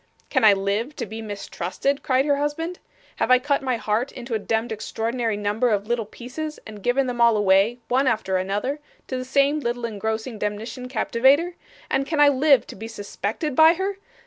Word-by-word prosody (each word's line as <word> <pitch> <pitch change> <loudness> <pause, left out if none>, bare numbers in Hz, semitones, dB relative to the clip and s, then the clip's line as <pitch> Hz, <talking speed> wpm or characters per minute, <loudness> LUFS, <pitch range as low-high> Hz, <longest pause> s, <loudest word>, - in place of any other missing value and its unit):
'Can - - +2
I 210 -2 +8
live 200 +8 -1
to 240 - -4
be 220 +2 -7
mistrusted?' 205 +5 -3
cried 260 +1 +2
her 285 -1 +2
husband. 325 +5 -3 0.4
'Have - - 0
I 255 - +7
cut 280 +3 0
my 255 -3 -1
heart 220 +4 -1
into 245 -1 -7
a 220 - +1
demd 225 +2 -1
extraordinary 225 +1 -2
number 210 +4 0
of 205 -2 0
little 230 -1 -1
pieces, 285 +8 -7
and 210 -2 -10
given 250 +5 +2
them 245 -1 -2
all 235 -2 +5
away, 200 +3 +3
one 260 +2 +2
after 215 -5 +1
another, 205 +10 -2 0.3
to 260 - -4
the 255 - -3
same 280 +3 +2
little 240 -3 -2
engrossing 220 +1 -3
demnition 215 +5 -4
captivater, 265 +8 +3 0.3
and 275 0 0
can 315 -2 -1
I 290 -1 +7
live 275 -1 +4
to - - -10
be 220 +3 -7
suspected 220 - -4
by 320 +3 +7
her? 385 +2 -3
240 Hz, 195 wpm, -23 LUFS, 215-275 Hz, 0.4 s, I